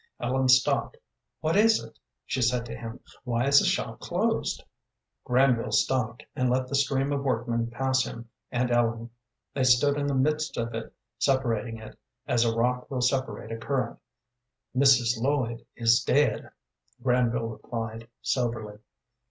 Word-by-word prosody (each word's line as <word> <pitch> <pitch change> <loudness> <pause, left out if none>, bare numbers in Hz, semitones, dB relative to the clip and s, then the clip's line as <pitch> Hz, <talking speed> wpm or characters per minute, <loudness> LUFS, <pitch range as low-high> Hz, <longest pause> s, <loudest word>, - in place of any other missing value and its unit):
Ellen 130 +2 0
stopped. 125 0 +3 0.4
"What 160 +3 0
is 220 +2 +5
it?" - - -14 0.3
she 130 - -2
said 120 0 +1
to 115 -1 -7
him. 115 +1 -8 0.2
"Why 120 -1 0
is 140 0 +6
the - - +1
shop - - -1
closed?" - - -1 0.6
Granville 125 -3 +2
stopped, 115 +2 0
and 130 -4 +1
let 130 +1 +1
the 140 - -9
stream 140 0 +1
of 140 - -1
workmen 120 -2 -1
pass 130 +2 +1
him 115 0 -8 0.2
and 125 0 0
Ellen. 115 -1 0 0.4
They 135 - 0
stood 130 +3 +4
in 145 0 -1
the 140 - 0
midst 150 +4 0
of 115 0 -2
it, 115 0 -5 0.3
separating 120 -4 0
it, 110 -1 -12 0.3
as 120 -1 +2
rock 125 +2 0
will 130 -2 -2
separate 125 -4 -1
a 115 - -3
current. 120 0 -2 0.8
"Mrs. 125 -3 +4
Lloyd 125 -4 -1
is 115 0 +4
dead," - - +1 0.5
Granville 120 -3 +1
replied, 115 0 -6 0.2
soberly. 110 -4 -2
125 Hz, 150 wpm, -27 LUFS, 115-130 Hz, 0.8 s, is